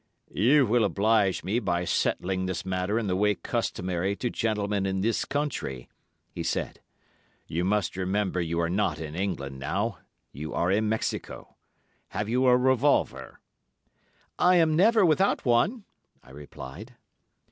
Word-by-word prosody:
"'You 130 +7 +4
will 115 +1 +2
oblige 105 -1 +2
me 100 +7 0
by 90 -5 -1
settling 95 +1 0
this 95 0 -4
matter 95 +3 -1
in 115 - -1
the 90 -2 0
way 105 +2 +2
customary 90 +2 -2
to 120 +3 -3
gentlemen 105 -3 -1
in 95 0 -1
this 115 +3 0
country,' 140 - -3 0.4
he - - -6
said. - - -3 0.7
'You 85 +2 -2
must 100 +1 0
remember 95 0 -1
you 85 0 -2
are 85 - +1
not 95 -3 0
in 80 -2 -6
England 80 -8 -3
now; 100 - -2 0.3
you 75 +3 -6
are 85 +2 +1
in 105 +2 +1
Mexico. 110 0 -4 0.5
Have 105 +2 -4
you 125 +3 +2
a 125 0 +6
revolver?' 130 +2 +1 1.0
"'I 180 +1 +5
am 160 -3 +4
never 215 +4 +5
without 175 +3 +2
one,' 135 - +2 0.4
I 65 - -17
replied. 75 - -10
100 Hz, 145 wpm, -27 LUFS, 90-120 Hz, 1.0 s, a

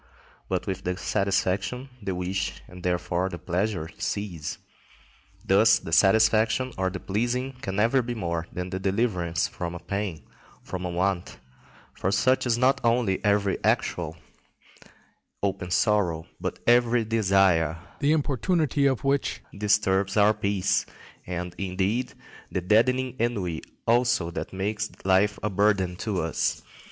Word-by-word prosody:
But - - -1
with 95 0 -4
the 90 0 -2
satisfaction 100 +6 -1
the 95 -2 -3
wish 90 +2 -3
and 90 0 -12
therefore 90 +1 0
the 85 - -6
pleasure 90 -1 -2
cease. 90 -7 -3 0.9
Thus 105 +3 +5
the - - -8
satisfaction 110 +7 +4
or 95 0 0
the 95 0 -6
pleasing 120 +7 -1
can 95 - -4
never 115 +6 +3
be 120 0 -4
more 85 -4 -3
than 90 0 -5
the 95 - -2
deliverance 95 -4 0
from 85 -1 -5
a - - -6
pain, 90 -2 -4 0.4
from 90 -1 -5
a - - -2
want; 90 +1 -1 0.6
for 95 - -2
such 130 +6 +2
is 115 -1 +2
not 130 +2 +3
only 115 -5 +1
every 100 -1 +1
actual, - - 0 1.3
open 95 -2 -1
sorrow, 90 -4 +1
but - - -3
every 120 -1 +4
desire, 95 -7 +3 0.2
the 145 +1 +2
importunity 150 0 +1
of 135 -1 0
which 140 0 0
disturbs 100 -1 +1
our 105 +1 +6
peace, 100 -2 0 0.4
and, 90 0 -4
indeed, 100 +6 -1 0.4
the 95 - -1
deadening 125 +6 +2
ennui 100 -9 -1 0.2
also 120 -7 +2
that 85 - -5
makes 105 +3 -2 0.2
life 95 +2 +3
a 105 - +1
burden 95 -2 +2
to 105 -4 -2
us. 80 - -1
100 Hz, 140 wpm, -26 LUFS, 90-115 Hz, 1.3 s, our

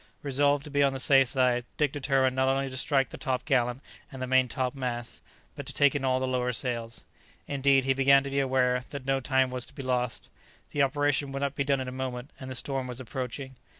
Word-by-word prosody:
Resolved 140 0 +2
to 150 - -8
be 145 0 +2
on 140 -1 +3
the 135 - -4
safe 135 0 +5
side, 125 -1 +1
Dick 150 -3 +2
determined 135 -2 +1
not 130 0 +2
only 135 0 0
to - - -7
strike 135 -1 +1
the - - -9
top 130 -3 -2
gallant 125 -2 +1 0.3
and 135 - -9
the 130 - -2
main 130 0 +3
top 125 0 -2
mast, 120 -3 -5 0.3
but - - -6
to - - -3
take 145 -1 +4
in 145 -2 -2
all 130 -1 +2
the 130 - -1
lower 125 -1 0
sails. 115 -2 -3 0.4
Indeed, 140 -1 +3
he 135 +1 +2
began 135 +1 +5
to 140 - -5
be 140 - +1
aware 130 -2 +1
that 140 -2 -7
no 135 0 +1
time 130 0 +1
was 125 -1 -3
to - - -11
be 135 - -6
lost. 125 -2 -2 0.4
The 145 - 0
operation 145 0 +1
would 135 +1 -3
not 140 -1 -1
be 140 - -1
done 140 -1 +1
in 130 - -5
a - - -4
moment, 130 0 -5
and 130 - -7
the 130 - -5
storm 135 0 -3
was 125 0 -6
approaching. 130 +1 -6
130 Hz, 245 wpm, -28 LUFS, 125-140 Hz, 0.4 s, safe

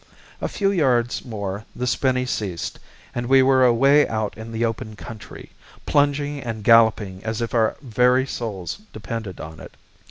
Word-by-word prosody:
A - - 0
few 195 -1 0
yards 125 -9 +1
more 100 -3 -5
the 125 - -2
spinney 125 0 +1
ceased, 100 -8 -4 0.3
and 120 0 -3
we 135 +1 +6
were 130 0 +4
away 135 +4 +5
out 110 -2 -2
in 110 +1 -9
the 115 +1 0
open 115 -1 -4
country, 110 -1 -10 0.3
plunging 145 0 +1
and 115 -4 -5
galloping 110 -4 +4
as 110 -1 -3
if 115 -1 -3
our 110 -2 +2
very 125 +1 +3
souls 110 - -5
depended 110 -3 -6
on 80 +1 -8
it. - - -12
115 Hz, 160 wpm, -22 LUFS, 110-130 Hz, 0.3 s, we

